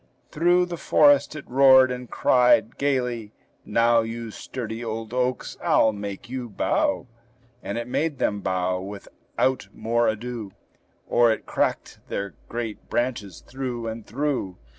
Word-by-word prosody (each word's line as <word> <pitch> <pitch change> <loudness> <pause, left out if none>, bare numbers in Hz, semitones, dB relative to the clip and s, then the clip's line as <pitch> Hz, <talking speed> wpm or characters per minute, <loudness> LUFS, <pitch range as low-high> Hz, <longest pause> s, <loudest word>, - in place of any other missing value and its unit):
Through 175 +3 +3
the 175 -1 -6
forest 145 -1 +4
it 155 - -8
roared, 130 0 +6
and 125 -1 -6
cried 125 -3 +3
gayly, 125 -6 -1 0.3
"Now, 115 0 +3
You 115 0 -5
sturdy 115 0 -6
old 115 0 -5
oaks, 125 0 -1
I'll 110 - +4
make 100 +2 -6
you 125 -1 -5
bow!" 295 - 0 0.6
And - - -4
it 120 0 -4
made 150 +3 -1
them 105 -3 0
bow 95 -1 -1
without 100 +6 -3
more 115 +1 0
ado, 110 -2 -4 0.5
Or 120 -1 +4
it 110 - -3
cracked - - -1
their 100 0 -4 0.2
great 115 -2 -5
branches 110 -7 -2
through 125 -3 -5
and 115 0 -5
through. 125 -5 -2
120 Hz, 140 wpm, -24 LUFS, 110-130 Hz, 0.6 s, roared